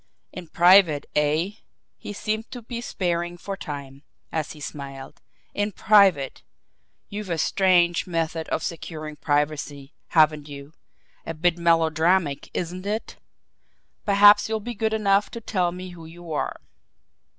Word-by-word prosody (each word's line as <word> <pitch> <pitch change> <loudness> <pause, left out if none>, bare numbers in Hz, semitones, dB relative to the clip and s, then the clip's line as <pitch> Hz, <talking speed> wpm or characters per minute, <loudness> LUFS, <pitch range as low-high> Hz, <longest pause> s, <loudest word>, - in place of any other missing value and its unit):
"In 180 -2 -8
private, 175 -3 +5
eh?" 150 +5 +1 0.4
he - - -8
seemed 215 +2 -3
to 245 -2 -9
be 235 +1 -6
sparring 175 -5 -2
for 195 +3 -5
time, 140 -6 -8 0.3
as 160 -2 -3
he 155 - -14
smiled. 140 -2 -8 0.3
"In 205 +1 -1
private! 190 -10 +3 0.7
You've 205 -1 -6
a 170 - -1
strange 175 0 +2
method 165 -1 -2
of - - -1
securing 155 -3 -6
privacy, 145 -1 -2
haven't 155 -2 +3
you? 140 +1 -10 0.5
A 165 - -6
bit 175 +2 +1
melodramatic, 165 -2 +2
isn't 180 +2 -4
it? 215 +2 -4 0.9
Perhaps 205 +1 +6
you'll 220 0 -1
be 240 +3 -6
good 220 0 -1
enough 200 -1 +2
to 235 - -7
tell 185 -6 -1
me 180 +1 -8
who 170 -2 -11
you 170 0 -11
are?" 150 - -2
175 Hz, 140 wpm, -24 LUFS, 155-200 Hz, 0.9 s, Perhaps